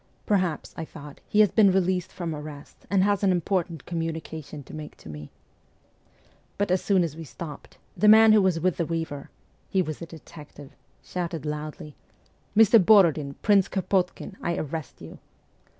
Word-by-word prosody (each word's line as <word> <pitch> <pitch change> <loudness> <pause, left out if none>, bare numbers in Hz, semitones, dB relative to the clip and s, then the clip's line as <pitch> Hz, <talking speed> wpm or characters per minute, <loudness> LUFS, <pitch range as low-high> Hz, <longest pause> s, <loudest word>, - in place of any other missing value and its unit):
'Perhaps,' 185 -7 -1
I 165 - -5
thought, 150 -2 -11
'he 210 - +4
has 210 - +4
been 205 -4 +5
released 185 -1 0
from 170 -3 -4
arrest, 150 -1 -10
and 190 0 +3
has 200 0 +1
an 195 - +4
important 175 -3 -1
communication 160 -3 -5
to - - -14
make 155 -1 -8
to - - -13
me.' 75 -1 -9 1.3
But 200 -2 0
as 185 - +2
soon 190 -3 +3
as 160 -3 -4
we 165 - -8
stopped, 155 0 -10 0.2
the 210 - +2
man 220 +1 +8
who 215 -1 +6
was 185 -3 +2
with 180 +1 0
the 170 - 0
weaver 160 -4 -4 0.4
he 190 -1 +2
was 155 -1 -6
a 170 - -6
detective 150 -3 -13 0.3
shouted 170 -3 -4
loudly, 150 0 -6 0.6
'Mr. 225 -1 +7
Borodin, 165 -9 +4
Prince 200 -2 +4
Kropotkin, 190 -1 -2
I 170 - -1
arrest 155 -1 -6
you - - -11
170 Hz, 165 wpm, -26 LUFS, 155-190 Hz, 1.3 s, man